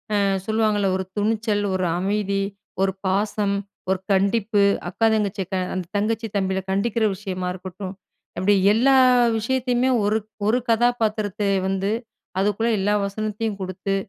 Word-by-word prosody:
அ - - +3 0.3
சொல்லுவாங்கள்ல, 215 -2 +1
ஒரு 190 - -2
துணிச்சல், 215 0 0
ஒரு 185 -1 0
அமைதி, 200 0 0 0.4
ஒரு 190 -1 +1
பாசம், 200 +1 0 0.4
ஒரு 190 - +1
கண்டிப்பு, 200 +2 +2 0.3
அக்கா, 225 +5 +1
தங்கச்சிய 205 -2 -1
க - - +2 0.2
அந்த 185 -1 -3
தங்கச்சி 225 +2 -1
தம்பிகள 190 -1 -1
கண்டிக்கிற 220 +3 0
விஷயமா 185 -2 -4
இருக்கட்டும், 185 +1 -7 0.4
அப்பிடி 200 +2 +3 0.2
எல்லா 260 +5 +4 0.4
விஷயத்தையுமே 250 +2 +1
ஒரு, 215 +1 +2 0.3
ஒரு 225 +3 +3
கதாபாத்திரத்தை 215 -4 +1 0.2
வந்து 195 +1 0 0.5
அதுக்குள்ள 210 +3 +1
எல்லா 205 +2 +1
வசனத்தையும் 215 +1 -3
குடுத்து, 190 +1 -2
205 Hz, 130 wpm, -23 LUFS, 195-220 Hz, 0.5 s, எல்லா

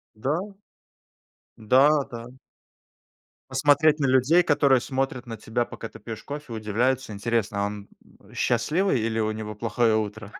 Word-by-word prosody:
Да. 160 - -2 1.0
Да, 130 +7 +4 0.2
да. 115 0 -7 1.2
Посмотреть 150 +1 +3
на 140 - +1
людей, 130 +7 +4
которые 140 -4 +3
смотрят 130 -1 -3
на 115 -2 -7
тебя, 120 +2 -2
пока 115 - -8
ты - - -13
пьешь 110 -2 -8
кофе, 145 -4 -7
удивляются: 115 +3 -1
"Интересно, 105 -1 -1
он 100 0 -6 0.5
счастливый 165 -4 +1
или 115 0 -1
у 110 0 0
него 110 -1 -6
плохое 115 0 +1
утро?" 110 0 -5
120 Hz, 135 wpm, -25 LUFS, 110-140 Hz, 1.2 s, Да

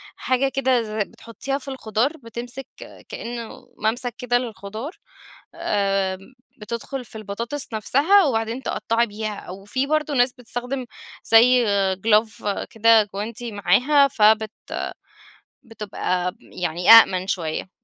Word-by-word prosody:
حاجة 260 +1 0
كده 260 -3 +1
ز 215 - -8
بتحطّيها 230 +5 -4
في 280 - -11
الخضار، 260 +3 -1
بتمسِك 240 +1 -8 0.4
كإنه 235 -1 -7
مَمْسك 240 +3 -1
كده 245 -2 +1
للخضار، 220 - -6 0.6
آمم 195 +1 -1 0.3
بتدخُل 235 +4 -5
في 220 -1 -10
البطاطس 230 +7 -4
نفسها 305 - +4
وبعدين 230 -1 -1
تقطّعي 235 0 0
بيها، 215 0 -5
أو 190 +2 -10
في 260 +7 0
برضه 305 0 0
ناس 245 -1 +3
بتستخدِم 250 +1 -5 0.4
زي 245 +2 +5 0.3
glove 210 0 +1
كده 225 0 +5
جوانتي 225 +3 -5
معاها، 250 +9 +4
فبت 220 -3 +3 1.1
بتبقى 195 -5 -3
يعني 175 0 -3
أَأْمن 190 -5 +7
شويّة، 165 -2 -3
230 Hz, 115 wpm, -22 LUFS, 210-255 Hz, 1.1 s, أَأْمن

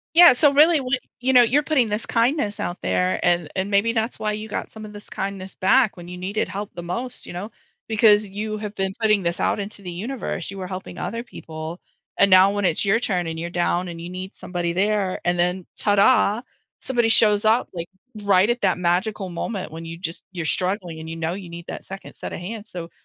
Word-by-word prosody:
Yeah. 345 -5 +9
So 290 +3 +4
really, 310 +4 +6
w 255 -1 0 0.2
you 260 +1 +1
know, 250 - +8
you're 265 +6 +3
putting 285 -7 +2
this 210 +2 -2
kindness 230 -2 0
out 175 - -4
there 90 0 +1
and 175 -3 +2
and 190 +2 -1
maybe 205 +3 +3
that's 225 +1 -1
why 215 0 -1
you 215 +1 -5
got - - -4
some 220 -1 -10
of 210 - -9
this 205 0 -11
kindness 195 -1 -5
back 215 +2 +3
when 175 0 -10
you 180 0 -7
needed 195 +4 -2
help 200 +2 -6
the 175 - -6
most, 235 +9 -4
you - - -8
know, 185 +5 -6 0.4
because 210 -2 +5
you 215 +2 -4
have 210 0 -6
been 190 -1 -1
putting 215 -3 +3
this 170 0 -1
out - - +1
into 205 0 -6
the 185 -2 -7
universe. 195 -1 -4
You 195 - -8
were 185 - -4
helping 185 0 -7
other 230 +2 -3
people 160 -3 -8 0.4
and 200 - +5
now 185 +1 +7
when 205 -1 0
it's 165 - +2
your 200 +3 +3
turn 180 -7 0
and 160 0 -4
you're 170 - -3
down 175 +1 0
and 170 - -7
you 175 - -7
need 185 +1 -7
somebody 175 -1 -3
there 200 -1 +1
and 175 0 +1
then 180 +1 +1
tada, 205 +2 +3 0.4
somebody 240 -3 +1
shows 215 -1 +5
up, 225 +3 +3
like, 170 -1 -6 0.3
right 200 +1 +4
at 240 +1 0
that - - +2
magical 185 +3 0
moment 185 0 -4
when 165 +1 -7
you 165 0 -7
just 165 -1 -6
you're 175 -3 -5
struggling 180 0 -1
and 160 - -8
you 165 - -5
know 165 0 -2
you 185 -1 -7
need 170 0 -9
that - - -6
second 195 0 -9
set - - -7
of - - -5
hands, 215 +3 -7
so 170 -4 -7
195 Hz, 230 wpm, -23 LUFS, 175-220 Hz, 0.4 s, Yeah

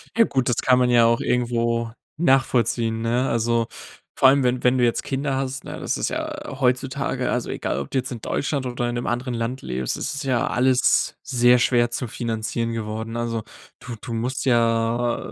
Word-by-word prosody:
Ja, 230 0 +5
gut, 130 - -1
das 120 - +1
kann 130 -1 +3
man 125 -1 +3
ja 120 -1 +6
auch 115 0 +2
irgendwo 115 -1 0 0.3
nachvollziehen, 120 -6 +2
ne? 120 +3 +1
Also, 115 0 +1 0.5
vor 135 - +5
allem, 135 0 +5
wenn 125 0 0
wenn 125 +1 +4
du 125 - +2
jetzt 120 -1 +2
Kinder 135 0 -2
hast, 135 0 -3
ne, - - -7
das - - -2
ist - - -1
ja - - -5
heutzutage 130 0 0
also, 125 - -2
egal, - - -2
ob 70 - -5
du - - -2
jetzt 130 0 -2
in 115 - -6
Deutschland 140 +1 -2
oder 120 0 -2
in 120 - -3
'nem 120 - -3
anderen 125 +1 -2
Land 115 +3 -3
lebst, 65 0 -3
es 155 - -3
ist 140 +1 -4
ja 130 -3 +1
alles 130 0 +2
sehr 125 -2 +4
schwer 120 -1 +2
zu 120 +1 -3
finanzieren 115 0 -3
geworden. 110 +1 -4
Also, 115 -1 -2 0.4
du 125 - -7
du 115 - -6
musst 125 +4 -2
ja, 115 -1 +2
120 Hz, 200 wpm, -23 LUFS, 115-130 Hz, 0.5 s, ja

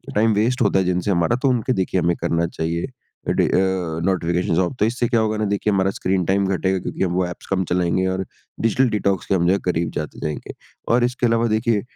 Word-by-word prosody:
Time 110 +1 +3
waste 120 +5 +1
होता 100 -3 +3
है 95 - +1
जिनसे 90 +2 0
हमारा 85 +7 +2
तो 135 - +3
उनके 125 +1 +1
देखिए 95 -2 0
हमें 85 +1 +1
करना 85 0 +1
चाहिए। 85 +3 -3 0.4
Day - - +2
a, 90 -4 0
notifications 85 -2 0
of. 95 +8 0
तो 105 - +4
इससे 120 +1 0
क्या 115 - +2
होगा 110 -1 0
ना 105 - 0
देखिए 100 +1 0
हमारा 95 0 +2
स्क्रीन 95 -1 -1
टाइम 95 +2 +2
घटेगा 95 +1 0
क्योंकि 95 - -3
हम 90 - 0
वो 90 0 +1
ऐप्स 90 - -9
कम 95 -1 0
चलाएँगे 90 +1 +1
और 95 0 -2 0.4
डिजिटल 115 +3 +2
डिटॉक्स 100 -3 0
के 95 - +1
हम 85 -1 +1
जो 95 - +4
है 100 - +1
करीब 85 -2 0
जाते 75 - -5
जाएँगे। 75 -1 -5 0.4
और 120 0 +3
इसके 125 0 0
अलावा 115 0 +2
देखिए 110 -1 +1
95 Hz, 230 wpm, -21 LUFS, 90-110 Hz, 0.4 s, तो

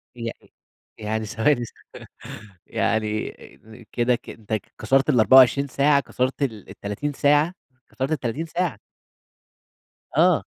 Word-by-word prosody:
يعني 115 -1 -8 0.5
يعني 110 +1 -2
ثواني 120 +4 +1
ثوا - - -13 0.9
يعني 110 -1 -1 0.6
كده 120 +1 +2
ك 120 - -11
أنت 110 0 -8 0.3
كسرت 135 +2 +2
ال24 130 +2 +6
ساعة، 140 +2 +3
كسرت 130 +1 -2
ال 110 -7 -4
ال30 105 +9 -4
ساعة، 145 +5 +3 0.4
كسرت 135 +2 -3
ال30 145 +1 -2
ساعة؟ 175 +1 -2 1.4
آه. - - +4
130 Hz, 110 wpm, -23 LUFS, 110-145 Hz, 1.4 s, ال24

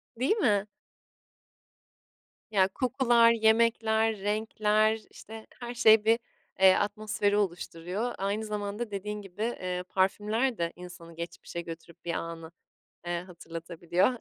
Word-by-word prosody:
Değil 265 - +1
mi? 210 - +2 1.8
Ya, 190 -2 +4
kokular, 240 0 +3
yemekler, 220 -1 +3
renkler, 215 +1 +1
işte, 220 0 -11
her 240 0 -5
şey 220 -2 +6
bir, 230 +1 +4 0.4
eee, 190 -1 +7
atmosferi 205 0 0
oluşturuyor. 185 +3 -2
Aynı 205 +3 -2
zamanda 210 +2 -4
dediğin 210 +1 -4
gibi, 195 +1 -10
eee, 180 -6 -2
parfümler 210 +6 +1
de 170 0 -2
insanı 175 -2 -11
geçmişe 170 0 -6
götürüp 165 0 -11
bir 170 - -1
anı, 165 -1 -5 0.6
eee, 175 0 -1
hatırlatabiliyor. 170 +1 -1
205 Hz, 115 wpm, -29 LUFS, 180-220 Hz, 1.8 s, eee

